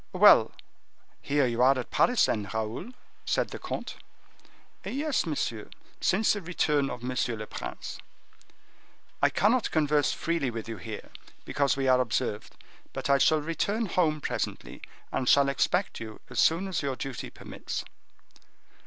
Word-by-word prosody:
"Well, - - +7 0.7
here 145 -1 +2
you 120 -1 0
are 135 +1 +5
at 125 - -5
Paris, 250 -1 +4
then, 105 -3 -2
Raoul?" 110 - -3 0.3
said - - 0
the - - -7
comte. - - -5 0.9
"Yes, 285 - -1
monsieur, 115 -8 -3 0.3
since 210 +4 +3
the 205 - -4
return 150 -5 +1
of 125 -1 -7
M. 130 +1 -3 0.2
le 110 - -5
Prince." - - -7 1.2
"I - - +5
cannot 225 +4 +2
converse 150 -2 +2
freely 165 -6 -1
with 115 -2 -6
you 115 -1 -5
here, 105 +3 -8 0.3
because 140 -1 +1
we 135 -1 0
are 130 0 +5
observed; 120 -3 -2 0.4
but - - -1
I 140 - +5
shall 155 +2 +4
return 200 +8 -1
home 160 -5 +1
presently, - - -4 0.3
and 130 - 0
shall 140 -1 +5
expect 160 +8 0
you 110 -1 -8
as 125 - -2
soon 170 +4 +3
as 190 - -2
your 140 -2 -2
duty 135 -1 -5
permits." - - -6
140 Hz, 150 wpm, -28 LUFS, 120-170 Hz, 1.2 s, Well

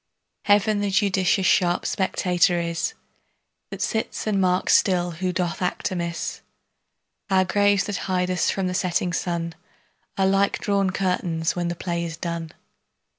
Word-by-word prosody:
Heaven 205 +1 +3
the 205 0 0
judicious 195 0 +2
sharp 175 -2 +2
spectator 180 -2 +1
is, 170 -1 -2 0.7
That - - -4
sits 220 -1 -2
and 205 -3 +1
marks 180 0 +3
still 180 -2 +2
who 180 +2 -2
doth 175 0 -2
act 180 - -1
amiss. 170 -2 -3 0.9
Our 190 -1 +3
graves 205 0 +3
that 205 - -3
hide 180 0 +1
us 180 - +1
from 195 - -1
the 180 - -1
setting 180 -1 0
sun 170 -1 -2 0.6
Are 195 - +3
like 195 +1 +2
drawn 200 -2 +1
curtains 180 -4 -1
when 175 -1 -1
the 170 - -2
play 170 0 -3
is 165 -2 -5
done. 170 -1 -4
185 Hz, 150 wpm, -24 LUFS, 175-195 Hz, 0.9 s, Heaven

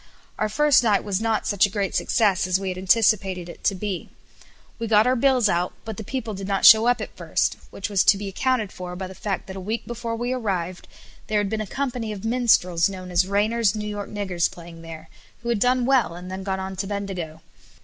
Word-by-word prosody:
Our 215 - 0
first 295 +4 +4
night 215 -4 +2
was 200 0 -2
not 225 -1 0
such 205 +1 +3
a - - -10
great 200 -1 -2
success 200 -5 +2
as 185 +1 +2
we 195 -1 -3
had 185 - -4
anticipated 190 -2 +2
it 170 - -11
to 195 - +2
be. 190 -2 -4 0.7
We 230 - -3
got 215 0 +5
our 255 +1 +3
bills 255 -2 +3
out; 175 -1 0
but 220 -2 -6
the 220 - -5
people 230 -1 -4
did 195 0 -6
not 195 -1 +1
show 220 +1 +9
up 245 -2 +2
at - - -7
first, - - 0
which 200 - -5
was 200 -3 +2
to 200 - +6
be 200 0 -5
accounted 220 +1 0
for 180 -1 -7
by 190 +1 -5
the 185 - -9
fact 195 0 -4
that 190 0 -8
a - - -5
week 215 +5 -3
before 235 -1 -4
we 240 +2 -2
arrived 185 -7 -3 0.4
there 215 - 0
had 205 -1 -1
been 220 -1 -1
a 215 - -5
company 245 -3 -3
of 210 0 -7
minstrels 215 -8 +3
known 185 -2 -8
as 180 +1 +2
Rainer's 210 +2 +1
New 210 0 -4
York 205 -1 -5
Niggers 190 -5 -1
playing 170 -1 -12
there, 165 -1 -10 0.4
who 235 - -3
had 235 -3 +1
done 250 +2 +2
well, 255 -9 +2
and 180 +1 -8
then 190 +1 -5
gone 190 0 -2
on 190 0 -5
to 195 +1 -3
Bendigo. 190 -6 -5
200 Hz, 235 wpm, -24 LUFS, 185-225 Hz, 0.7 s, show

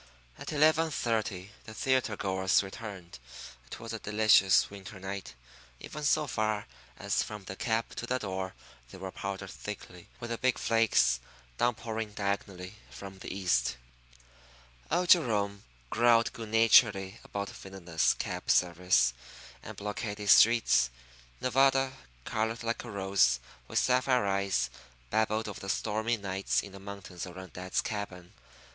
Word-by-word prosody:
At - - -6
eleven 155 +2 +4
thirty 110 -8 -2
the 110 - -10
theatre 130 -5 +1
goers 95 0 +2
returned. 95 - -9 0.5
It - - -8
was 115 0 -7
a 115 - -4
delicious 105 -3 +4
winter 100 0 -10
night. 95 -3 -6 0.4
Even 150 - -8
so 150 +1 +3
far 110 -5 -1 0.3
as - - 0
from 105 -2 -6
the 95 - -7
cab 115 +2 -1
to 120 - -4
the 125 - +1
door 95 -4 -4 0.3
they - - -11
were 95 0 -6
powdered 95 -1 -5
thickly 100 -4 -9
with 120 0 -6
the 115 - -3
big 130 -1 +2
flakes 105 - +3 0.4
downpouring 110 -2 -1
diagonally 100 -1 -3
from 95 -1 -10
the - - -7
east. 85 -11 +1 1.1
Old 175 +2 +1
Jerome 105 - +3 0.3
growled 115 0 +4
good 115 -2 -7
naturedly 110 -3 +4
about 100 0 -4
villainous 90 -4 -1
cab - - -5
service 90 -8 +3 0.5
and - - -9
blockaded 105 0 -4
streets. 110 - +6 0.5
Nevada, 135 +1 +3 0.3
colored 110 +2 -2
like 115 0 -2
a 120 - -8
rose, 95 - +2 0.3
with - - -3
sapphire 125 -2 +3
eyes, 95 -11 0 0.4
babbled 110 0 +1
of 105 - -6
the 95 - -7
stormy 110 +3 0
nights 95 -1 -1
in 100 - -9
the 100 - -11
mountains 100 -2 -8
around 90 -1 -10
dad's 90 +1 -1
cabin. 95 -4 -6
100 Hz, 140 wpm, -30 LUFS, 95-115 Hz, 1.1 s, streets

